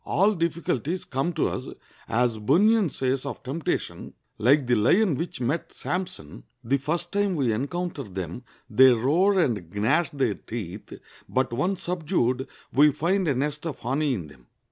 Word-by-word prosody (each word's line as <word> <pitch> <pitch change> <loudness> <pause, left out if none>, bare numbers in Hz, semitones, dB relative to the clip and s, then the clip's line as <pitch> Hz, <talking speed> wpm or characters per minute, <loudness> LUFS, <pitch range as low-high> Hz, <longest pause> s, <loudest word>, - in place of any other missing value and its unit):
All 200 +4 +2
difficulties 170 - -2
come 135 +6 -1
to - - +1
us, - - -5 0.4
as 115 -1 +1
Bunyan 195 - +4
says 130 -1 -1
of 140 - -6
temptation, 140 +4 -3 0.2
like 135 +5 +4
the 125 - +1
lion 165 - +4
which 165 +2 -4
met 140 +7 -2
Sampson, 175 - -5 0.2
the 135 +4 +1
first 170 +5 -2
time 200 -2 +1
we 130 -7 +1
encounter 150 +7 -3
them 95 -2 -6 0.3
they 130 +2 +6
roar 165 - +2
and 105 - 0
gnash 120 +10 +2
their 135 -7 0
teeth, 100 0 -7 0.4
but 130 -2 0
once 180 +9 -1
subdued 150 -8 0 0.3
we 145 +3 +6
find 180 +6 0
a 140 - +2
nest 150 +4 -2
of 150 - -4
honey 135 +3 0
in 90 -7 -5
them. 70 -5 -17
140 Hz, 160 wpm, -25 LUFS, 120-170 Hz, 0.4 s, they